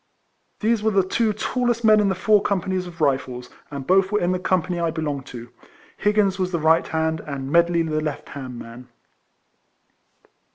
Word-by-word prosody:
These 225 0 +2
were 220 - +2
the 195 -2 +3
two 220 +4 0
tallest 240 +2 -1
men 215 -1 +6
in 205 -1 +2
the 190 - 0
four 210 +2 +3
companies 185 -2 -1
of 175 - -10
Kifles; 130 -5 -1 0.2
and 140 -2 -6
both 190 +3 +3
were 210 - +2
in 175 +1 0
the 185 - -1
company 180 -1 0
I 170 -1 0
belonged 150 -4 -4
to. 120 -2 -9 0.5
Higgins 205 -2 +1
was 185 -1 -1
the 170 - 0
right 160 +1 +3
hand, 160 0 -1
and 140 -2 -6
Medley 170 0 +3
the 155 -1 -1
left 150 -2 -5
hand 130 -3 -7
man. 120 +2 -10
175 Hz, 180 wpm, -22 LUFS, 150-200 Hz, 0.5 s, men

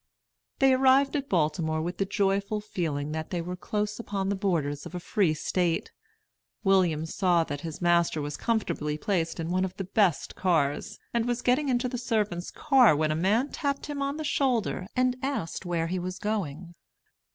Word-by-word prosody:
They 270 -1 +5
arrived 265 +2 +4
at 280 -1 -2
Baltimore 160 -2 +1
with 175 +3 -4
the 195 - +1
joyful 200 +1 0
feeling 155 -8 -3
that 160 0 -4
they 180 - -2
were 180 +2 -4
close 210 +3 -3
upon 195 -4 -2
the 200 - +1
borders 160 -8 -1
of - - -10
a - - -2
Free 175 -3 +1
State. 175 +1 -1 0.7
William 180 -6 +3
saw 175 0 +2
that 145 -2 -5
his 165 +1 -6
master 170 -2 +3
was 145 0 -3
comfortably 175 -10 -1
placed 165 -2 -1
in 165 +1 -3
one 185 +1 +1
of 185 -1 -3
the 195 - -2
best 190 -3 +1
cars, 160 -6 0 0.2
and 235 0 +1
was 240 0 -1
getting 270 +3 +2
into 250 0 +1
the 245 -1 -4
servants' 210 -7 -1
car 255 - +5
when 155 +1 +1
a - - 0
man 210 - +2
tapped 280 -1 -2
him 290 -2 -4
on 280 +1 -1
the 310 - -4
shoulder 245 -10 0
and 255 0 +2
asked 260 - -3
where 170 -2 0
he 180 +2 -2
was 180 +1 -4
going. 180 -5 -3
190 Hz, 185 wpm, -28 LUFS, 165-235 Hz, 0.7 s, They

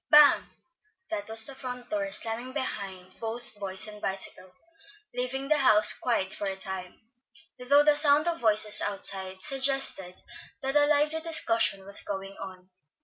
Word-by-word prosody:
Bang! 295 -1 +6 0.7
that 310 -7 -5
was 220 0 +5
the 275 - -7
front 250 -1 -9
door 300 -2 -2
slamming 235 0 0
behind 190 -9 -6
both 230 +2 -7
boys 195 +1 -4
and 210 -1 -11
bicycle, 190 -1 -5 0.6
leaving 255 +2 -4
the 305 0 +2
house 215 -5 +5
quiet 215 -6 -2
for 205 - -5
a 195 - -3
time, 190 -1 -7 0.6
though 280 +4 +3
the 300 0 +3
sound 295 +1 +3
of 335 -1 -2
voices 215 -2 +4
outside 190 -2 -3
suggested 270 -9 +1 0.5
that 270 +1 -2
a 290 0 +4
lively 300 +2 +1
discussion 230 -11 +2
was 200 0 0
going 195 0 -6
on. 185 -1 -11
230 Hz, 150 wpm, -27 LUFS, 195-285 Hz, 0.7 s, Bang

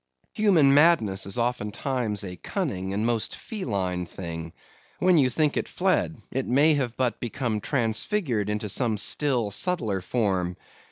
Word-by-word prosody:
Human 175 -10 +4
madness 140 - +4
is 95 - -4
oftentimes 120 -1 -1
a 90 -2 -6
cunning 95 - -3
and 105 +3 -1
most 115 -2 -1
feline 95 - -3
thing. 85 -2 -7 0.5
When 180 -2 +4
you 130 -3 +4
think 150 +4 +1
it - - -1
fled, 185 -3 0
it 135 0 -2
may 145 +5 +4
have 130 -5 -2
but 125 -2 0
become 120 -3 -2
transfigured 120 - 0
into 105 +1 -2
some 110 +1 +1
still 120 0 +1
subtler 110 - 0
form. 95 -4 -1
120 Hz, 145 wpm, -26 LUFS, 100-145 Hz, 0.5 s, Human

